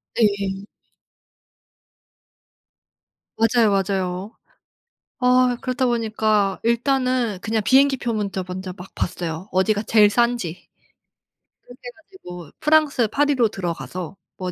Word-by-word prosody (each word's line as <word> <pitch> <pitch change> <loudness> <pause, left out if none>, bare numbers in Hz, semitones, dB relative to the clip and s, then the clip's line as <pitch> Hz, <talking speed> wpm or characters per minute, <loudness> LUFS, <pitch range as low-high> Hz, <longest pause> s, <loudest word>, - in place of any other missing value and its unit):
네. 200 -3 0 2.7
맞아요, 225 0 +3
맞아요. 195 0 -1 0.9
아 250 -1 +3
그렇다 255 0 -1
보니까 215 -4 0
일단은 250 -2 +1
그냥 220 0 -1
비행기 270 +3 +4
표 240 -2 -3
먼저 200 -3 -3
먼저 185 0 -6
막 185 0 -11
봤어요. 175 0 -4
어디가 205 +3 +1
제일 210 -1 +5
싼지. 235 -7 -1 0.9
그렇게 245 +1 -16
해 - - -6
가지고 180 - -12
프랑스 300 -6 +3
파리로 275 0 +2
들어가서 175 -2 -5 0.2
뭐 185 -1 -4
215 Hz, 230 characters per minute, -22 LUFS, 190-245 Hz, 2.7 s, 제일